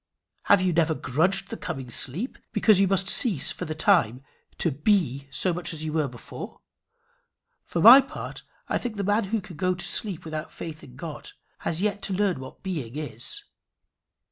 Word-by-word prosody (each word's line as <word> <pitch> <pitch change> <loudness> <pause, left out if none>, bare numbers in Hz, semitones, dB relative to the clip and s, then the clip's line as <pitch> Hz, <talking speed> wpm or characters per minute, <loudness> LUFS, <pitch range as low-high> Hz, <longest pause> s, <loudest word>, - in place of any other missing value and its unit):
Have 200 -2 +5
you 180 -2 +2
never 160 -1 +2
grudged 180 +10 0
the 225 - -4
coming 130 -2 -6
sleep, 175 - -2
because 210 -2 +5
you 195 - +4
must 195 0 +1
cease 195 - +3
for 180 - -5
the 155 -1 -4
time 145 - +3 0.3
to 170 - +1
be 145 - +1
so 140 +7 0
much 175 0 -4
as 155 -1 -4
you 155 - -3
were 155 -3 +1
before? 120 -3 -9 1.1
For 170 - -2
my 245 +6 +11
part, 270 - -8 0.3
I - - 0
think 240 -3 -4
the 200 - -2
man 205 +2 +2
who 220 +3 -1
can 180 -5 -11
go 185 +2 +1
to 175 - -5
sleep 195 -7 -1
without 155 0 -5
faith 160 -2 -8
in 125 - -13
God 155 +2 -8 0.3
has 170 +3 -2
yet 210 -1 0
to 195 - -2
learn 195 -5 +1
what 130 0 -11
being 150 -11 -4
is. 145 -6 -3
175 Hz, 190 wpm, -26 LUFS, 150-195 Hz, 1.1 s, my